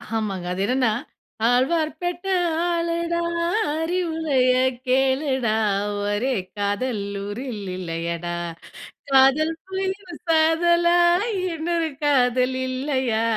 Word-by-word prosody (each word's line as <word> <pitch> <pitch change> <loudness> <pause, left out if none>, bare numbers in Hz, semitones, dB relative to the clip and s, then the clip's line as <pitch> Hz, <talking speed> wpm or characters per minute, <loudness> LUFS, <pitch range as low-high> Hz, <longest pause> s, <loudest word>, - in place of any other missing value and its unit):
ஆமாங்க. 200 -5 -2
அது 185 - -3
என்னன்னா? 255 +1 +2 0.6
ஆழ்வார்பேட்ட 330 +8 0 0.4
ஆளுடா! 340 0 -1 0.6
அறிவுரைய 320 -6 +1 0.3
கேளுடா! 265 -2 +1 0.5
ஒரே 205 +6 0 0.2
காதல் 205 +3 -1 0.2
ஊரில் 215 +1 -5
இல்லையடா! 170 0 -3 0.8
காதல் 270 +4 +5 0.2
போயின் 380 -2 -4
சாதலா! 340 +2 +4 0.6
இன்னொரு 330 0 -1 0.2
காதல் 255 -2 +2
இல்லையா! 255 -3 -1
270 Hz, 75 wpm, -23 LUFS, 235-335 Hz, 0.8 s, காதல்